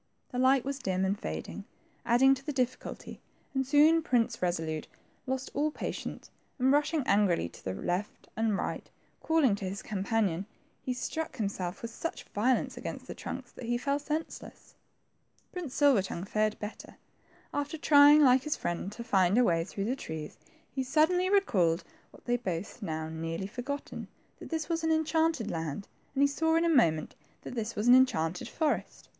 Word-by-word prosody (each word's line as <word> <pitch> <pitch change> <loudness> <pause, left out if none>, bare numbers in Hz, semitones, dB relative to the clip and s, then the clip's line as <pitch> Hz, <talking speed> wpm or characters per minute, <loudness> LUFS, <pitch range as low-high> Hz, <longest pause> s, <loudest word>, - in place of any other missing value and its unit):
The 250 - -3
light 260 0 +4
was 275 0 -3
dim 190 -5 0
and 195 +1 +1
fading, 80 - -5 0.4
adding 255 +3 +6
to 270 0 -5
the 295 - -3
difidculty, 255 -2 -3 0.3
and 265 -1 0
soon 305 +4 +5
Prince 245 -7 +1
Kesolnte 160 -3 -2 0.4
lost 265 0 -3
all 295 +2 +1
patience, - - -6 0.3
and 260 0 +3
rushing 295 +1 +2
angrily 200 - +3
to - - -15
the 95 0 -3
right 180 - -1 0.3
and 220 -2 +1
left, - - -3 0.3
calling 320 -8 +3
to 195 -2 -4
his 195 +1 -6
companion, 200 -2 -1 0.3
he 255 - -3
struck 260 +3 -4
nimself 195 -3 -3
with 230 - -4
such 330 - -5
violence 245 +5 +1
against - - -6
the - - -6
trunks - - -7
that - - -9
he 240 0 +1
fell 280 +3 0
senseless. 305 +2 -5 0.8
Prince 345 -8 -6
Silver 280 -8 +5
tongue 185 -2 -5
fared 215 +2 0
better. 210 +1 -8 0.6
After 290 +2 -2
trying, 295 0 +7
like 255 -1 +6
his 300 +2 -1
friend, 175 +3 -3
to 235 - -7
find 195 -3 +3
a 250 - +6
way 165 -6 +2
through 195 +3 -4
the 250 +4 0
trunks, 160 - -7 0.4
he 265 - -1
suddenly 320 +7 +2
recalled 185 - +2 0.3
what - - -19
they 240 - 0
had 245 - -1
both 185 +6 -4
now 160 -4 -3
nearly 165 +3 -4
forgotten, 260 +7 -5 0.3
that - - -9
they 325 - 0
were 330 -1 0
in 320 - 0
the 320 - +4
enchanted 315 -6 +1
land, 165 +3 -4 0.3
and 280 +1 +5
saw 320 +3 +1
in 330 +1 +3
a - - +3
moment 165 - +3 0.3
that - - -7
this 230 -2 -3
was 210 +3 -1
an 245 - +9
enchanted 180 -10 +3
forest. 315 -2 -2
245 Hz, 180 wpm, -30 LUFS, 190-290 Hz, 0.8 s, an